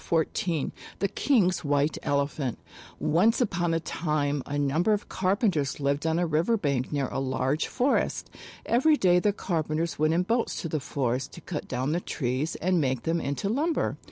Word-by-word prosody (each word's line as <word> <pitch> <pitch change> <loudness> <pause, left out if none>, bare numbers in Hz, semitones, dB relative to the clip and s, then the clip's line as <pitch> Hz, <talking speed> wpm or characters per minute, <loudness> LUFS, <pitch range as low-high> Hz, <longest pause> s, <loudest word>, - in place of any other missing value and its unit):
68 165 -2 +1
XIV 165 -6 -1 0.3
THE 200 - +1
KING'S 195 -10 +2
WHITE 145 +1 +1
ELEPHANT 140 -3 -1 0.4
ONCE 205 +9 +3
upon 175 -8 +1
a - - +1
time 150 -3 -1
a 145 - -2
number 150 +9 +2
of 205 - -2
carpenters 185 - 0
lived 140 +2 0
on 160 0 +1
a 175 - +2
river 170 +8 +2
bank 140 - -1
near 140 -3 0
a - - -3
large 135 +2 0
forest. 260 +2 0 0.3
Every 295 +6 +4
day 180 -5 +4
the 205 +3 +2
carpenters 165 -4 -2
went 155 +1 +3
in 180 - +2
boats 230 +5 0
to - - -2
the 155 -1 -1
forest 130 -2 -2
to 170 - -10
cut 155 -1 -5
down 130 +4 -1
the 170 +2 0
trees 130 +2 -2
and 180 -1 +1
make 130 -3 0
them 165 0 0
into 140 +7 -2
lumber. 295 +10 0
160 Hz, 185 wpm, -27 LUFS, 140-185 Hz, 0.4 s, Every